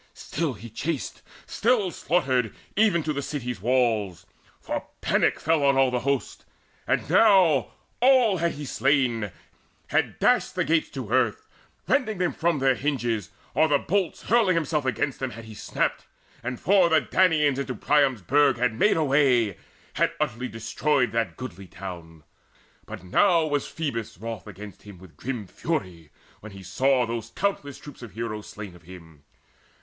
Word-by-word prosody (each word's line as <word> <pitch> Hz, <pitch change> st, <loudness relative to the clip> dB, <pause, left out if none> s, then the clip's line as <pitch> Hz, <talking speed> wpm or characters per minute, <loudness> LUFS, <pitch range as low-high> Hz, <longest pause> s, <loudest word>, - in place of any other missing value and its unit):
Still 155 Hz, -3 st, -3 dB
he 110 Hz, +1 st, -10 dB
chased, 140 Hz, +5 st, -4 dB, 0.2 s
Still 220 Hz, -5 st, +1 dB
slaughtered, 130 Hz, -, 0 dB, 0.2 s
even 205 Hz, -6 st, +3 dB
to 155 Hz, -, -1 dB
the 140 Hz, -, -3 dB
city's 125 Hz, -7 st, -5 dB
walls; 110 Hz, -7 st, 0 dB, 0.3 s
For -, -, -4 dB
panic -, -, +1 dB
fell 160 Hz, -2 st, +1 dB
on 140 Hz, -1 st, +4 dB
all 135 Hz, -1 st, +4 dB
the 125 Hz, -, 0 dB
host. 140 Hz, +1 st, -2 dB, 0.4 s
And -, -, 0 dB
now 180 Hz, -, +4 dB, 0.3 s
All 250 Hz, -6 st, +5 dB
had 170 Hz, 0 st, 0 dB
he 145 Hz, 0 st, -7 dB
slain, 130 Hz, -6 st, +1 dB, 0.6 s
had -, -, 0 dB
dashed -, -, +2 dB
the -, -, +1 dB
gates 160 Hz, 0 st, +1 dB
to 125 Hz, -6 st, -7 dB
earth, 120 Hz, -4 st, +1 dB, 0.4 s
Rending 250 Hz, -6 st, +1 dB
them 180 Hz, -1 st, 0 dB
from 170 Hz, -1 st, 0 dB
their 135 Hz, -1 st, +3 dB
hinges, 120 Hz, -, -2 dB, 0.2 s
or 155 Hz, -, +4 dB
the 145 Hz, -2 st, +3 dB
bolts, 185 Hz, +3 st, -1 dB
Hurling 220 Hz, -6 st, +3 dB
himself 150 Hz, -3 st, 0 dB
against 130 Hz, +2 st, -1 dB
them, 130 Hz, -, -2 dB
had 115 Hz, -1 st, -10 dB
he 110 Hz, -, -10 dB
snapped, -, -, -2 dB, 0.3 s
And 125 Hz, 0 st, -4 dB
for 190 Hz, -3 st, +4 dB
the 160 Hz, -2 st, +4 dB
Danaans 150 Hz, -4 st, +2 dB
into 135 Hz, -2 st, -3 dB
Priam's 135 Hz, -4 st, +2 dB
burg 145 Hz, -, +3 dB
Had 125 Hz, -1 st, +1 dB
made 165 Hz, -, +3 dB
a 160 Hz, -, +2 dB
way, 130 Hz, -, +3 dB, 0.4 s
had -, -, +1 dB
utterly 125 Hz, +3 st, -2 dB
destroyed 125 Hz, +5 st, 0 dB
That 115 Hz, -1 st, -2 dB
goodly 100 Hz, -7 st, -8 dB
town 85 Hz, -4 st, -9 dB, 0.6 s
but -, -, -8 dB
now 165 Hz, -, +3 dB
was 145 Hz, -2 st, -1 dB
Phoebus 115 Hz, -, -4 dB
wroth 110 Hz, 0 st, -7 dB
Against 105 Hz, 0 st, -10 dB
him 100 Hz, -3 st, -12 dB
with 85 Hz, -4 st, -16 dB
grim 120 Hz, -, -5 dB
fury, 90 Hz, -, -4 dB, 0.3 s
when 110 Hz, -1 st, -11 dB
he 95 Hz, -1 st, -11 dB
saw 130 Hz, +7 st, +2 dB
Those 115 Hz, 0 st, -5 dB
countless 145 Hz, -5 st, -2 dB
troops 145 Hz, -3 st, -12 dB
of 115 Hz, -6 st, -10 dB
heroes 110 Hz, -1 st, -5 dB
slain 105 Hz, -4 st, -9 dB
of 90 Hz, -, -16 dB
him. 80 Hz, -4 st, -14 dB
130 Hz, 165 wpm, -25 LUFS, 110-155 Hz, 0.6 s, All